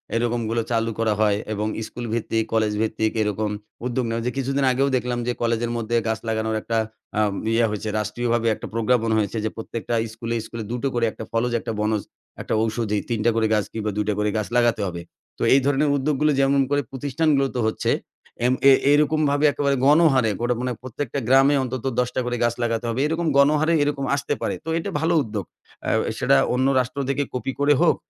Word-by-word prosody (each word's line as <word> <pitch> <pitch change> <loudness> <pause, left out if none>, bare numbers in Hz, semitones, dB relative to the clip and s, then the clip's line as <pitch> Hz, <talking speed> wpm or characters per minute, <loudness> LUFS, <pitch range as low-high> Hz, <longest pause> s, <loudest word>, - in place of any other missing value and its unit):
এরকম 120 +1 0
গুলো 115 +1 0
চালু 115 0 +1
করা 110 -1 +2
হয় 105 -2 +3 0.2
এবং 105 +1 -2 0.2
স্কুল 120 - -7
ভিত্তিক, 115 -1 0
কলেজ 110 -1 +2
ভিত্তিক 110 0 0
এরকম 105 0 -1 0.4
উদ্যোগ 125 0 -1
নেওয়া 115 0 -2
যে, 125 - 0
কিছুদিন 135 +1 0
আগেও 135 +2 +1
দেখলাম 125 -1 -1
যে - - +2
কলেজের 115 0 0
মধ্যে 115 0 -2
গাছ 110 0 -1
লাগানোর 110 0 -1
একটা 115 +1 -2 0.4
আ - - +4 0.3
ইয়ে 115 +1 +3
হইছে, 105 +1 -3
রাষ্ট্রীয়ভাবে 120 +1 -1
একটা - - -8
প্রজ্ঞাপন 115 0 +1
হয়েছে 110 +1 -1
যে, - - +1
"প্রত্যেকটা 115 +1 -5 0.2
স্কুলে, 115 +1 -4
স্কুলে 115 0 -6
দুটো 125 +3 -1
করে, 120 -1 +1
একটা 110 - -8
ফলজ, 115 +2 0
একটা 115 - -5
বনজ, 105 0 0 0.4
একটা - - -3
ঔষধি 110 -1 -1
৩ 115 -2 -1
টা 120 - +5
করে 110 -1 +2
গাছ 105 -2 +2
কিংবা 110 -1 -2
২ 105 - 0
টা - - +2
করে 105 0 +1
গাছ 110 - -2
লাগাতে 120 -3 +2
হবে।" 85 -1 -5 0.4
তো - - -12
এই 135 - +6
ধরনের 145 +1 +2
উদ্যোগগুলো 150 +2 +1
যেমন 135 0 +3
করে 145 0 +2
প্রতিষ্ঠানগুলোতে 140 0 0
হচ্ছে। 110 - 0 0.5
এম 125 - +3 0.2
এ - - +9 0.2
এরকমভাবে 150 0 +3
একেবারে 140 -1 0
গণহারে, 145 -5 +5
গোটা 120 +1 +1
মানে 125 0 -1
প্রত্যেকটা 130 +2 -4
গ্রামে 135 +3 +5
অন্তত 130 -1 -5
১০ 125 0 +1
টা - - +1
করে 120 0 -1
গাছ 120 0 +2
লাগাতে 115 0 -1
হবে। 115 +2 -2
এরকম 165 +2 -1
গণহারে 150 +3 +4
এরকম 145 -1 -1
আসতে 140 - -2
পারে। - - -1
তো - - -4
এটা 165 - -3
ভালো 165 +3 +1
উদ্যোগ। 105 -4 -5 0.4
আ - - +1 0.3
সেটা - - +4 0.2
অন্য 130 +2 +2
রাষ্ট্র 130 +2 -2
থেকে 145 +1 +1
কপি 125 +1 -2
করে 145 +1 +4
হোক, - - +4
120 Hz, 200 wpm, -23 LUFS, 110-135 Hz, 0.5 s, এ